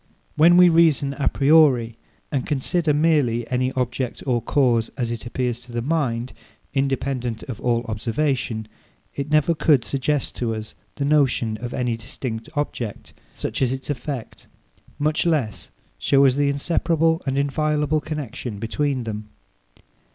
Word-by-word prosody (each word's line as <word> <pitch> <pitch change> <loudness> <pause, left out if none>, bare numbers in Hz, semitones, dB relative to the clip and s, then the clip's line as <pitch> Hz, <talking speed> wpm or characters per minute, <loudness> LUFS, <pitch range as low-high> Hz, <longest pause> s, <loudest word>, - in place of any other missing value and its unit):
When 170 +3 +6
we 180 0 +8
reason 160 -5 +4
a 140 - 0
priori, 135 -6 +4 0.4
and 135 -3 0
consider 155 +3 +1
merely 145 -7 +2
any 130 +1 +1
object 125 -1 -2
or 120 -3 +1
cause, 120 -5 +2
as 120 -3 -1
it 120 0 -5
appears 120 -1 -2
to 120 0 -14
the 120 0 -3
mind, 130 -5 -1 0.4
independent 135 -3 -1
of 125 -4 -7
all 120 -1 +1
observation, 115 0 -2 0.5
it 140 +1 -4
never 155 +2 +3
could 150 -6 +3
suggest 140 +3 -1
to 115 -2 -1
us 110 0 -7 0.2
the 140 - -2
notion 135 -6 +2
of 120 +2 -6
any 125 -2 -1
distinct 115 -1 -6
object, 125 -7 -4 0.2
such - - -4
as 125 -2 +2
its 130 +2 -4
effect; 135 -2 -6 0.5
much 150 +1 +1
less, 150 -11 -1 0.3
show 140 - +4
us 130 - +5
the 145 0 +2
inseparable 165 +3 +1
and 135 0 0
inviolable 150 +2 +1
connexion 130 -8 -5
between 130 +4 -1
them. 105 -1 -6
135 Hz, 145 wpm, -23 LUFS, 120-150 Hz, 0.5 s, we